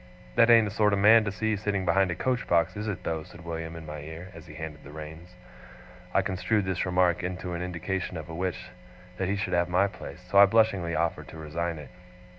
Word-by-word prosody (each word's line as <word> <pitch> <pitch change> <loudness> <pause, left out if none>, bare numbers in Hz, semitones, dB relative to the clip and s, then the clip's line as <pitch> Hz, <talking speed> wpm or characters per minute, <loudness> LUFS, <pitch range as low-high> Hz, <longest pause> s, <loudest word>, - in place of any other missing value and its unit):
'That 115 - +5
ain't 115 -2 +7
a - - -4
sort 105 -1 +2
of - - +2
man 110 +3 +7
to 105 - -2
see 110 +3 -1
sitting 100 -2 -2
behind 95 +2 +3
a 85 - -2
coach 125 +6 -1
box, 85 +1 +2
is 105 +1 -4
it 100 -4 -4
though?' 80 -1 -2
said 85 +2 -13
William 80 -1 -5
in 80 -1 -8
my 75 0 -7
ear, 80 +5 -9
as - - -12
he 75 - -11
handled 80 -2 -7
the 70 - -12
reins. 80 +4 -10 0.8
I - - +2
construed 100 +2 0
this 95 -1 -1
remark 90 -1 +2
into 90 0 -4
an 85 - -3
indication 90 +1 -3
of 80 - -7
a 80 - -8
wish 90 +2 -4 0.5
that 95 - -1
he 100 - +1
should 100 -3 -2
have 85 0 +2
my 90 +3 +3
place, 100 -2 -8
so 100 +2 +4
I 100 - +9
blushingly 100 -6 +2
offered 80 +1 -1
to - - -11
resign 80 +2 -3
it. 75 - -10
90 Hz, 235 wpm, -27 LUFS, 85-100 Hz, 0.8 s, I